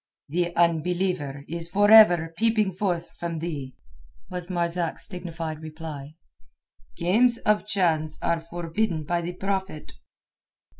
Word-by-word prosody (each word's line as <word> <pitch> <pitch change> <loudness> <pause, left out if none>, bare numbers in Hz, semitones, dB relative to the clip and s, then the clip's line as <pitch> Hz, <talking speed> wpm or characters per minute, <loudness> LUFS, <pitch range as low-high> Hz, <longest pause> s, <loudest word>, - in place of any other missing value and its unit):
"The 175 +2 -1
unbeliever 170 -4 0
is 170 +1 -5
for 205 +4 +3
ever 175 -7 +7
peeping 220 -1 +2
forth 180 -2 -2
from 170 -1 -3
thee," 150 -5 -5 0.6
was 180 -1 -5
Marzak's 170 -1 -1
dignified 165 -4 -6
reply. 155 -2 -8 0.8
"Games 230 +8 +3
of 210 -1 +1
chance 160 -6 +1
are 170 0 +1
forbidden 170 +1 -2
by 170 +3 -1
the 175 +1 -4
Prophet." 190 -4 -3
170 Hz, 115 wpm, -25 LUFS, 160-190 Hz, 0.8 s, ever